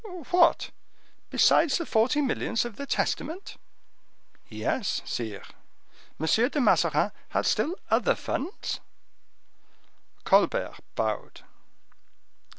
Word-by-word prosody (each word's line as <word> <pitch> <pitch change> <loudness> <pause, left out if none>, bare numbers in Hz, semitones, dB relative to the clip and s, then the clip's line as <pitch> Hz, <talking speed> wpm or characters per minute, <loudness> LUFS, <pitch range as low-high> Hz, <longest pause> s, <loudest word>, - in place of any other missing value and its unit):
"What! 350 -1 +4 0.6
besides 320 -3 +4
the 335 - -3
forty 250 +6 +2
millions 240 -3 0
of 240 -3 -7
the 280 - -7
testament?" 340 +6 -2 0.9
"Yes, 225 -7 -2
sire." 110 -4 -4 0.8
"M. 160 - -1 0.2
de 295 - -2
Mazarin 255 - +3 0.2
had - - -1
still 340 - +1 0.2
other - - +3
funds?" 335 +9 -4 1.4
Colbert - - +2 0.2
bowed. - - -3
280 Hz, 90 wpm, -27 LUFS, 225-330 Hz, 1.4 s, What